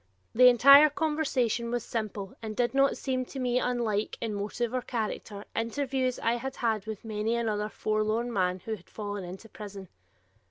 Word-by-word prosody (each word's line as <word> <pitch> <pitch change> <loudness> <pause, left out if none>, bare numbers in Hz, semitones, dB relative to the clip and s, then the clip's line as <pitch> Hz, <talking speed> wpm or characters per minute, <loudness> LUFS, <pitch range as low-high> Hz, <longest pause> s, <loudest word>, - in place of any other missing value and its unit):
The 250 +2 +7
entire 275 +5 +8
conversation 280 -7 0
was 240 -1 -2
simple 210 -4 -4
and 220 -1 -5
did 240 +2 +1
not 275 0 +3
seem 255 -1 -1
to 270 - -10
me 250 -1 +1
unlike, 235 -5 -1
in 225 -2 -3
motive 215 +4 -3
or 255 - 0
character, 215 -3 -4
interviews 255 +2 -1
I 230 +1 0
had 265 +2 -5
had 220 -3 -1
with 220 0 -6
many 220 +1 -1
another 215 -3 -1
forlorn 215 +3 -1
man 185 -2 0
who 225 - -7
had 185 -5 -9
fallen 205 -2 -5
into 185 +5 -9
prison. 200 -3 -9
230 Hz, 170 wpm, -29 LUFS, 210-250 Hz, -, entire